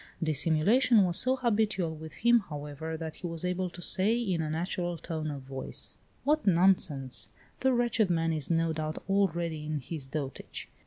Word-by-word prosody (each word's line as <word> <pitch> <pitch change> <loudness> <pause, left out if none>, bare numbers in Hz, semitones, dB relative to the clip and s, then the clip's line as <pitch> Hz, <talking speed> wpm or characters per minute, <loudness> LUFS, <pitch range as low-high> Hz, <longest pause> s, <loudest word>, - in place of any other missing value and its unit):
Dissimulation 165 - +4
was 175 -2 +1
so 255 +1 +3
habitual 215 -8 +1
with 160 0 -9
him, 240 0 +7
however, 150 +2 -5
that 160 -1 -6
he 180 - -5
was 165 +1 -4
able 180 0 -1
to 175 0 -8
say, 210 +8 +2
in 190 -8 0
a 155 - -2
natural 175 +2 -2
tone 160 -2 -4
of 140 -2 -6
voice: 135 0 -5 0.2
"What 300 -3 +1
nonsense! 170 -8 +2 0.3
The 265 - +3
wretched 240 -4 +2
man 165 -1 +1
is 155 -3 +2
no 165 -1 +2
doubt 155 0 -4
already 170 -5 0
in 155 0 -2
his 140 +1 -5
dotage! 135 -1 -5
165 Hz, 170 wpm, -30 LUFS, 155-195 Hz, 0.3 s, him